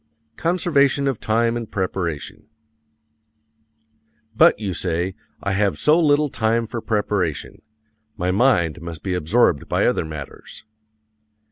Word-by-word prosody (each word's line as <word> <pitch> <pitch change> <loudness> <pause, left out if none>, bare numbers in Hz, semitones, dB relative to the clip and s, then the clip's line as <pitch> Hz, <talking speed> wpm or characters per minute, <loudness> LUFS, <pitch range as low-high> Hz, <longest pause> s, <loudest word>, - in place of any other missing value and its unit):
Conservation 145 -5 +2
of 135 -5 -1
Time 115 +2 +1
in 120 -2 -4
Preparation 95 -2 -4 1.9
But, - - +6
you 100 -4 -3
say, 85 +2 -2 0.3
I 100 - -1
have 100 0 +1
so 155 +3 +4
little 150 -2 +3
time 115 +1 0
for 115 +1 -5
preparation 105 -8 -2 0.6
my 90 -1 0
mind 90 - +2
must 85 -1 -8
be 95 - -2
absorbed 90 - +1
by - - +1
other - - +1
matters. 75 +5 -9
105 Hz, 120 wpm, -21 LUFS, 85-120 Hz, 1.9 s, But